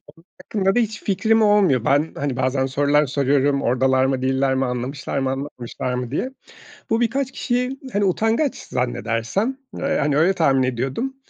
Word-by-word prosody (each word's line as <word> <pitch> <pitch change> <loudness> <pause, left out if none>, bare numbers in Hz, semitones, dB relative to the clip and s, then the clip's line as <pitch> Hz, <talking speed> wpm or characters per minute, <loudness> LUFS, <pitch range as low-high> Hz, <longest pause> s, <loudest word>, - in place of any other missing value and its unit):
onlar 165 - -22 0.2
hakkında 195 -2 0
da - - +4
hiç 220 -2 -2
fikrim 220 +3 +2
olmuyor. 200 - +3
Ben, 145 +4 +2
hani, 140 -3 -3
bazen 130 +1 +1
sorular 145 +2 +2
soruyorum, 140 +1 +1
oradalar 130 +2 +2
mı 135 -1 0
değiller 130 0 +1
mi 130 0 +1
anlamışlar 130 +3 -3
mı, 135 -1 0
anlamışlar 130 -2 -5
mı 125 -1 -3
diye. 245 - -1 0.6
Bu 225 +1 +1
birkaç 265 +3 0
kişiyi 250 +2 -2
hani 205 0 +2
utangaç 225 - +1
zannedersem, 120 - -2 0.2
ııı, 275 - -2
yani 150 - +1
öyle 170 +5 +4
tahmin 135 -7 +2
ediyordum 130 - -2
140 Hz, 165 wpm, -21 LUFS, 130-210 Hz, 0.6 s, da